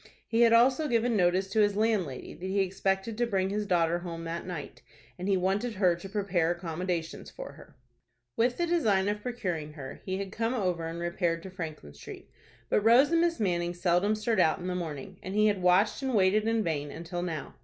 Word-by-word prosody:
He 230 +1 +1
had 230 -1 +6
also 255 +6 +4
given 235 -2 +1
notice 185 0 +2
to 220 - +1
his 205 -1 +2
landlady 205 - -1
that 185 - -7
he 195 +1 +1
expected 195 +3 -1
to 240 - +2
bring 190 -3 0
his 210 0 -2
daughter 170 -2 +2
home 170 -1 -6
that 165 +2 -5
night, 170 -5 -7 0.4
and 180 - -4
he 195 -1 +3
wanted 195 +5 -1
her 185 -3 +3
to 175 +3 -9
prepare 190 -5 0
accommodations 170 -1 -3
for - - -8
her. - - -16 0.6
With 245 +2 +1
the 345 - +1
design 220 - +2
of 210 0 -2
procuring 180 -11 -4
her 135 -4 -9
he 190 0 -3
had 195 -1 -5
come 230 +4 -1
over 180 -7 -1
and 165 +1 -5
repaired 170 -1 -1
to 190 - -8
Franklin 155 - -7
Street; - - -11 0.4
but - - +2
Rose 240 +7 +5
and 335 0 +4
Miss 340 -1 +1
Manning 175 -4 0
seldom 180 +4 +2
stirred 215 0 0
out 160 -3 +4
in 180 - -8
the 180 - -2
morning, 175 +1 -6
and 190 +2 -6
he 215 0 +4
had 205 -3 +2
watched 180 +7 +3
and 265 -3 -1
waited 205 +2 +3
in 225 -1 +1
vain 150 -4 -2
until 170 +4 -5
now. 165 -4 -4
190 Hz, 215 wpm, -29 LUFS, 175-215 Hz, 0.6 s, had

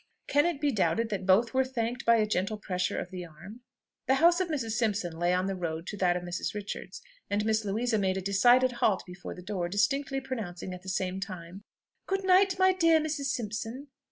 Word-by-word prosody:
Can 290 +4 +3
it 340 -5 -2
be 290 -1 +1
doubted 225 +1 +1
that 195 -3 -3
both 220 +5 +4
were 265 0 +3
thanked 250 -1 -3
by 235 - +7
a 220 -2 +3
gentle 210 +1 -1
pressure 180 -4 -2
of 180 - -4
the 180 -1 -6
arm? 175 +8 -12 0.5
The 265 - +4
house 340 +5 +5
of 370 - 0
Mrs. 270 -9 -2
Simpson 210 -6 -1
lay 175 +2 +1
on 180 +1 +1
the 195 - -1
road 165 -2 -4
to 205 - -6
that 180 -2 +2
of 180 - -6
Mrs. 175 +3 -4
Richards, 205 -1 -6 0.3
and 205 +1 0
Miss 220 0 +1
Louisa 220 +3 0
made 190 -1 0
a - - -2
decided 245 +7 +4
halt 215 -5 +1
before 180 +1 -8
the 180 - -11
door, 185 -3 -3
distinctly 270 +7 0
pronouncing 205 -9 -5
at 180 - -8
the 190 - -8
same 185 0 -2
time, 185 -1 -7 0.5
"Good 390 0 -1
night, 375 0 +4
my 375 0 +5
dear 330 -3 +4
Mrs. 305 -2 -2
Simpson!" 240 +2 -4
215 Hz, 215 wpm, -29 LUFS, 185-265 Hz, 0.5 s, by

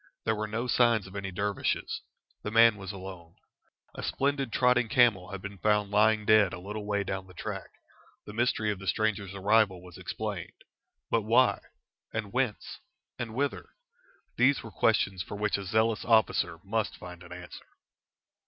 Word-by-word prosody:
There 110 - +2
were 110 0 -3
no 115 +3 -2
signs 120 -4 +3
of 95 +1 -12
any 100 -1 -3
dervishes. 100 +2 -2 0.4
The - - -4
man 115 0 +6
was 95 -1 -6
alone. 95 -4 -9 0.6
A - - -7
splendid 140 -2 -1
trotting 125 -1 +3
camel 110 -8 +4
had 100 -2 -7
been 100 -1 -7
found 105 +1 +2
lying 105 +1 +3
dead 105 -4 +5
a - - -6
little 105 +3 -6
way 100 -1 0
down 95 0 -4
the 90 - -15
track. - - -5 0.6
The 105 - -9
mystery 110 -2 +1
of 100 - -5
the 95 - -9
stranger's 100 -3 0
arrival 100 -1 +3
was 90 -2 -12
explained. - - -5 0.5
But 115 - +3
why, 115 +4 +4 0.5
and 110 -2 -4
whence, 125 -4 -2 0.4
and 115 -2 -4
whither? 140 +2 -2 0.6
these 135 +3 +3
were 115 - -9
questions 95 0 +1
for 100 - -6
which 105 0 0
a 100 - -6
zealous 110 +2 +1
officer 110 -7 +2
must 110 +2 -2
find 90 -1 -10
an 90 -1 -13
answer. 90 0 -10
105 Hz, 170 wpm, -29 LUFS, 95-115 Hz, 0.6 s, man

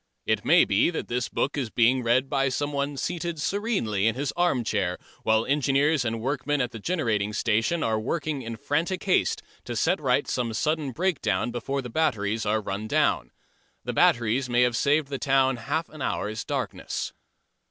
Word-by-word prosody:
It - - +1
may - - +6
be 100 +9 +3
that 175 - -4
this 120 -1 -1
book 140 - -1
is 135 -6 -2
being 125 +3 +3
read 125 +3 +2
by 135 -1 +1
someone 140 +1 -2
seated 170 +2 -3
serenely 150 - 0
in 115 - +1
his 140 +2 -2
arm 175 -8 +1
chair 95 -5 -1 0.2
while 110 +1 +2
engineers 140 +1 +2
and 115 -1 -2
workmen 140 +4 -1
at 125 -2 0
the 115 - -7
generating 110 - -1
station 115 +10 +1
are 110 -1 +1
working 145 +4 -2
in 115 -1 -5
frantic 165 - -1
haste 190 - +1 0.2
to - - -4
set - - +1
right - - +1
some 115 -3 -2
sudden 155 +2 0
breakdown 120 - 0
before 135 +3 -3
the 125 - -6
batteries 110 -8 0
are 110 +1 +1
run 100 +1 -4
down. - - +1 0.5
The - - -3
batteries 120 +3 +2
may 120 0 +4
have 125 -1 +2
saved 140 +5 +2
the 135 -2 -3
town 135 -2 +2
half 150 +8 -2
an 155 - -11
hour's 110 -3 -2
darkness. - - -3
130 Hz, 180 wpm, -26 LUFS, 115-145 Hz, 0.5 s, may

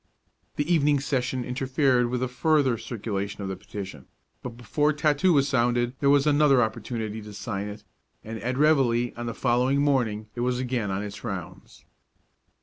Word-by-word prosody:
The 145 - -1
evening 145 -3 +3
session 130 -2 -1
interfered 130 -1 +1
with 125 0 -1
a - - 0
further 135 0 +2
circulation 105 -3 -4
of 95 - -4
the 95 - -3
petition; 95 -6 -8 0.3
but 120 -2 -7
before 145 +6 +1
tattoo 150 +3 +2
was 140 -4 +3
sounded 120 -2 +1
there 140 - +2
was 140 0 +4
another 145 -2 +4
opportunity 110 -1 -4
to 105 0 -10
sign 100 -1 -4
it, 105 0 -8 0.4
and 110 +1 -6
at 125 +5 -2
reveille 130 -6 +3
on 120 0 -5
the 115 - -4
following 125 +3 +2
morning 120 -7 +1
it 120 - -8
was 125 0 0
again 125 -4 -2
on 95 +1 -2
its 105 0 -8
rounds. 95 -8 -7
125 Hz, 170 wpm, -26 LUFS, 110-140 Hz, 0.4 s, was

